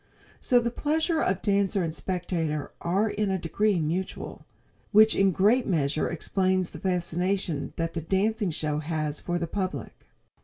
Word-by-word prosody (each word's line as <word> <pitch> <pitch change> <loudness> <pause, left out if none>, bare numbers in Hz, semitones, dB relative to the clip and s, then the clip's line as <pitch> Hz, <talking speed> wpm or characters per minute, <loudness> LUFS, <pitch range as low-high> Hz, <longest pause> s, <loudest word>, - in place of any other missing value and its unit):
So 245 - +4
the 235 0 -1
pleasure 315 +5 0
of 185 0 0
dancer 200 -1 +2
and 160 -1 -2
spectator 165 -5 -2
are 190 +6 +1
in 210 -1 -1
a 190 - +1
degree 190 +3 +1
mutual, 170 +4 -4 0.4
which 220 +1 +7
in 195 -1 +4
great 210 +8 +3
measure 155 -4 0
explains 185 +1 0
the - - -9
fascination 180 -2 -1
that 165 0 -2
the 165 - -3
dancing 195 +4 0
show 150 -2 -1
has 155 -1 -3
for 175 0 -2
the 170 - -2
public. 185 +2 -5
185 Hz, 155 wpm, -27 LUFS, 165-200 Hz, 0.4 s, which